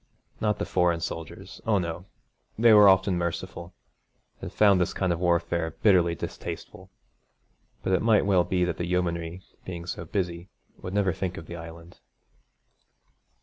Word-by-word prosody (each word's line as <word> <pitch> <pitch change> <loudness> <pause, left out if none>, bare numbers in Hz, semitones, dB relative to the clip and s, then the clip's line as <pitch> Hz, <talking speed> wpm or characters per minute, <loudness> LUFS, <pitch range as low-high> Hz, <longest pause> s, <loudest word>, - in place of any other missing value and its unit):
Not 105 -1 0
the - - -2
foreign 90 -2 +1
soldiers 80 0 -7
oh 110 -2 +3
no, 85 0 -4 0.5
they 115 0 +6
were 105 -1 +8
often 95 -1 +3
merciful, 85 +1 -5 0.7
and - - -6
found 100 -3 +4
this 90 - -1
kind 95 -2 +1
of 85 - -4
warfare 85 -2 0
bitterly 90 -5 +4
distasteful. - - -7 0.9
But 95 - 0
it 95 - +2
might 110 -3 +3
well 95 -3 +3
be 90 0 0
that 90 -2 -3
the 85 - -3
yeomanry, 85 0 -2 0.2
being 85 -2 -7
so 85 -1 -5
busy, 85 0 -3 0.3
would 90 +2 -6
never 100 -3 +2
think 90 0 -4
of 80 - -8
the 85 - -8
Island. 85 +1 -11
90 Hz, 155 wpm, -26 LUFS, 85-95 Hz, 0.9 s, were